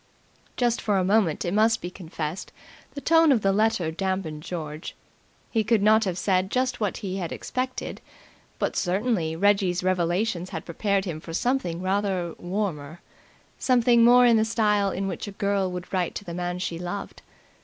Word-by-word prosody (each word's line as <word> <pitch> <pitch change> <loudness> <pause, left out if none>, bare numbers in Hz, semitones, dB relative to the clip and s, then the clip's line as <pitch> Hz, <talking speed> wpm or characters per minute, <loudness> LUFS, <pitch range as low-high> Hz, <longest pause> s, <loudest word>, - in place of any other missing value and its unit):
Just 240 -1 +1
for 205 -2 +1
a 185 - +2
moment 190 -5 +2
it 175 - -1
must 220 +2 +3
be 175 - -6
confessed, 165 -1 -6 0.4
the 285 - -5
tone 325 -1 +5
of 240 -5 +3
the 195 - +3
letter 205 -6 +1
damped 185 -3 -3
George. 155 -1 -6 0.6
He 225 -2 +1
could 215 -1 +2
not 220 +1 +5
have 180 -2 -2
said 185 0 +1
just 255 +2 0
what 205 -5 -1
he 190 0 -3
had 175 -4 -4
expected, 255 0 -4 0.6
but - - -1
certainly 185 -3 0
Reggie's 190 -1 +2
revelations 180 +1 0
had 160 - -6
prepared 195 +3 0
him 165 -4 -4
for 165 +1 -9
something 185 -5 -1
rather 190 -3 -1
warmer, 175 -5 -3 0.6
something 240 -2 +4
more 245 +1 +7
in 235 -2 +5
the 220 - +3
style 210 -3 +2
in 195 +1 -3
which 195 - -4
a 205 - -7
girl 200 -1 0
would 180 +1 -7
write 180 -2 -1
to 205 - -6
the 170 - -6
man 175 0 -3
she 175 -2 -4
loved. 180 +3 -6
195 Hz, 175 wpm, -25 LUFS, 175-220 Hz, 0.6 s, more